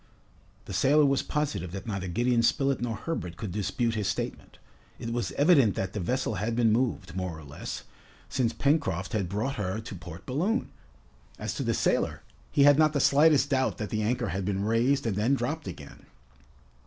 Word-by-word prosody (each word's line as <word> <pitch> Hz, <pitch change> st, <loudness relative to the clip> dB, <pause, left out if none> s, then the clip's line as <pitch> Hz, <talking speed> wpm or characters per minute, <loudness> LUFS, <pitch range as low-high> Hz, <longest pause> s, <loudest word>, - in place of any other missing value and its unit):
The -, -, -7 dB
sailor 145 Hz, +10 st, +4 dB
was 140 Hz, -1 st, +2 dB
positive 150 Hz, -, -2 dB
that 95 Hz, -, -6 dB
neither 100 Hz, -4 st, -3 dB
Gideon 120 Hz, +6 st, +2 dB
Spilett 135 Hz, +2 st, +1 dB
nor 120 Hz, -2 st, -1 dB
Herbert 95 Hz, -, -4 dB
could 105 Hz, -5 st, -5 dB
dispute 110 Hz, +4 st, -1 dB
his 105 Hz, -3 st, -1 dB
statement. 100 Hz, -, -4 dB, 0.4 s
It 115 Hz, 0 st, -5 dB
was 120 Hz, 0 st, -2 dB
evident 140 Hz, -, +4 dB
that 95 Hz, -1 st, -3 dB
the 105 Hz, -, -3 dB
vessel 125 Hz, +5 st, -1 dB
had 115 Hz, +2 st, -1 dB
been 115 Hz, -2 st, +3 dB
moved, 105 Hz, -7 st, 0 dB
more 90 Hz, -3 st, -3 dB
or 80 Hz, -, -11 dB
less, 70 Hz, 0 st, -7 dB, 0.4 s
since 120 Hz, -3 st, 0 dB
Pencroft 95 Hz, -, 0 dB
had 100 Hz, -5 st, -1 dB
brought 115 Hz, +8 st, -2 dB
her 100 Hz, 0 st, -2 dB
to 110 Hz, -1 st, -8 dB
Port 85 Hz, -2 st, -9 dB
Balloon. 175 Hz, -, -1 dB, 0.7 s
As -, -, -3 dB
to -, -, -4 dB
the -, -, 0 dB
sailor, -, -, 0 dB, 0.3 s
he 145 Hz, -2 st, +4 dB
had 145 Hz, +1 st, +7 dB
not 155 Hz, -1 st, +4 dB
the 145 Hz, -, +1 dB
slightest 145 Hz, 0 st, +4 dB
doubt 130 Hz, -1 st, +1 dB
that 105 Hz, -2 st, -5 dB
the 110 Hz, -, 0 dB
anchor 120 Hz, +1 st, 0 dB
had 95 Hz, +3 st, -2 dB
been 100 Hz, +1 st, -1 dB
raised 120 Hz, +5 st, +2 dB
and 110 Hz, -4 st, 0 dB
then 115 Hz, +7 st, +2 dB
dropped 145 Hz, +6 st, -3 dB
again. 70 Hz, 0 st, -10 dB
115 Hz, 190 wpm, -28 LUFS, 95-140 Hz, 0.7 s, had